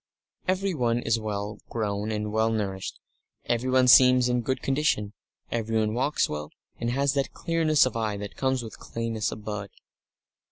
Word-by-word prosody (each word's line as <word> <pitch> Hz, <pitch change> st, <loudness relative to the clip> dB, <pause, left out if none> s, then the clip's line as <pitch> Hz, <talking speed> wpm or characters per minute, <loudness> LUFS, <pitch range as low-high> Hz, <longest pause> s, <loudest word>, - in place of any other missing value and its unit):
Everyone 180 Hz, -11 st, +1 dB
is 115 Hz, -1 st, +1 dB
well 105 Hz, -1 st, -4 dB
grown 105 Hz, -1 st, -2 dB
and 105 Hz, 0 st, -2 dB
well 110 Hz, +1 st, +2 dB
nourished; 100 Hz, -4 st, -3 dB, 0.5 s
everyone 130 Hz, +2 st, +2 dB
seems 125 Hz, 0 st, +7 dB
in 125 Hz, 0 st, +1 dB
good 130 Hz, +3 st, -2 dB
condition; 135 Hz, -7 st, 0 dB, 0.4 s
everyone 110 Hz, -2 st, 0 dB
walks 135 Hz, +5 st, +1 dB
well, 75 Hz, 0 st, -5 dB, 0.3 s
and 120 Hz, -, -1 dB
has 135 Hz, +2 st, +1 dB
that 140 Hz, -1 st, -1 dB
clearness 160 Hz, -4 st, +2 dB
of 130 Hz, -, -3 dB
eye 110 Hz, -3 st, -1 dB
that 100 Hz, 0 st, -7 dB
comes 130 Hz, -2 st, 0 dB
with 110 Hz, -, -9 dB
cleanness 115 Hz, -2 st, -3 dB
of 105 Hz, -, -8 dB
blood. 105 Hz, -2 st, -4 dB
115 Hz, 155 wpm, -26 LUFS, 105-130 Hz, 0.5 s, seems